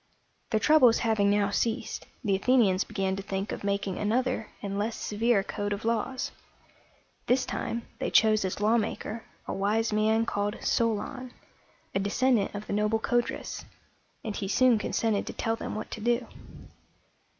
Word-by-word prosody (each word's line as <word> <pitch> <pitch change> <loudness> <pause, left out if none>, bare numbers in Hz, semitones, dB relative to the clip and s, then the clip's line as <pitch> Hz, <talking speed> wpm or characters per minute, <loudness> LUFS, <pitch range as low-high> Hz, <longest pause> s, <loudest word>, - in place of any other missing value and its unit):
Their 220 - +2
troubles 255 -2 +6
having 215 -3 +3
now 205 0 +2
ceased, 230 +3 -2 0.2
the 200 -4 +2
Athenians 200 -3 +3
began 190 -1 -2
to - - -3
think 195 0 -3
of - - -5
making 200 -2 -1
another 230 +1 0
and 200 0 -3
less 220 +2 -1
severe 215 -1 +1
code 205 0 -3
of 205 +2 -6
laws. 230 +3 -1 1.0
This 255 +1 +3
time 235 0 -3 0.2
they - - -1
chose 215 -1 +4
as 190 +1 -3
lawmaker 220 +1 0 0.2
a - - -2
wise 215 +3 0
man 220 +1 +2
called 205 -1 -1
So´lon, 235 +4 -1 0.6
a - - +1
descendant 210 +2 +1
of 205 +1 -5
the - - -4
noble 210 +2 +2
Codrus; 240 +2 -1 0.6
and 215 -3 -4
he 195 - -3
soon 245 +2 +4
consented 215 -1 0
to - - -4
tell 225 -1 -1
them - - -5
what 215 - -5
to 215 - -6
do. 240 +2 +1
215 Hz, 160 wpm, -28 LUFS, 205-235 Hz, 1.0 s, troubles